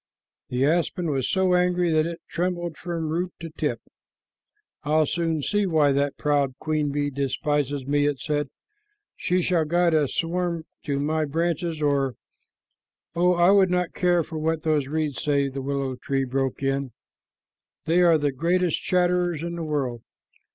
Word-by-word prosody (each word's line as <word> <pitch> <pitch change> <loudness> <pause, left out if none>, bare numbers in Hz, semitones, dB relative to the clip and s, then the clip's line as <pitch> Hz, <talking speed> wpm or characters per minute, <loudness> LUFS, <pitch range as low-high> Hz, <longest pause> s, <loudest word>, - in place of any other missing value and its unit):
The 125 +2 +1
aspen 170 +1 0
was 135 -3 -1
so 190 -1 +2
angry 180 -1 +2
that 155 0 +2
it 170 0 -6
trembled 175 -1 -2
from 165 0 -4
root 175 +3 -2
to 165 -1 -7
tip. - - -2 1.0
"I'll 155 +1 +2
soon 165 -1 -1
see 205 +3 +1
why 155 -4 +3
that 140 +1 0
proud 145 -3 +1
queen 155 -2 -1
bee 145 0 -1
despises 140 0 -1
me," 145 +1 +2
it 145 -2 0
said. 145 +1 -2 0.7
"She 180 0 0
shall 170 -3 +2
guide 170 +2 +2
a 150 -2 +3
swarm 170 +1 -2 0.2
to 140 -2 -1
my 155 +2 0
branches 165 +1 -1
or" 140 -3 +1 1.0
"Oh, 180 +2 +3
I 175 +2 +5
would 195 -2 +5
not 180 -1 0
care 175 -2 +2
for 160 0 -6
what 160 0 -1
those 150 -4 +1
reeds 150 -2 -2
say," 140 -2 +1
the 135 0 -5
willow 135 -1 -2
tree 135 +1 -1
broke 135 +1 -2
in. 135 -1 -1 0.9
"They 170 +3 +3
are 170 -2 +6
the 145 -1 0
greatest 170 +5 0
chatterers 175 -3 +1
in 170 0 -3
the 170 - -4
world. 135 -6 -2
155 Hz, 165 wpm, -25 LUFS, 140-175 Hz, 1.0 s, are